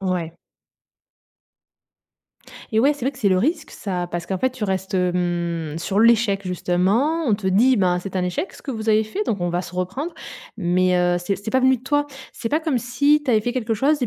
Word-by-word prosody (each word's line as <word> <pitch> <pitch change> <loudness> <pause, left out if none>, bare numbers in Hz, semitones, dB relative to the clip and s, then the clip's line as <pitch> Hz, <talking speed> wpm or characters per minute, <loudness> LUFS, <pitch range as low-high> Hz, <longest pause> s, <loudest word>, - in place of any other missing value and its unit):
Ouais. 180 -4 -2 2.4
Eh - - +4
ouais, 285 +4 +4
c'est 290 - -14
vrai 270 - 0
que 255 - -15
c'est 205 - +2
le 185 - +3
risque 310 - 0
ça, 180 -3 -4
parce 175 0 -3
qu'en 190 +1 -3
fait 260 - +2
tu 255 -4 -5
restes, 190 0 -2
hem, 175 -3 -1
sur 195 +5 0
l'échec 225 -3 +4
justement, 200 - +1
on 220 - +3
te 200 -2 -5
dit: 235 +8 +4
«Ben, 180 -3 +2
c'est 190 +1 -6
un 180 - 0
échec 180 - -2
ce - - -14
que 280 - -5
vous 220 -3 -4
avez 215 0 +4
fait, 375 - -3
donc 200 -5 -1
on 175 - 0
va 175 +1 0
se 180 - -9
reprendre», 245 - -3 0.4
mais, 180 -1 +2
heu, 175 0 +2
c'est 180 +2 -2
c'est 200 +3 -6
pas 260 - +2
venu 260 0 +4
de 245 - -17
toi. 290 +2 +1 0.3
C'est 230 - -4
pas 305 +6 +1
comme 310 -6 0
si 270 +6 +2
tu 270 - -1
avais 215 -2 +3
fait 245 - -1
quelque 230 -3 -1
chose 285 +6 +1
et 245 - +1
205 Hz, 230 wpm, -22 LUFS, 180-260 Hz, 2.4 s, Eh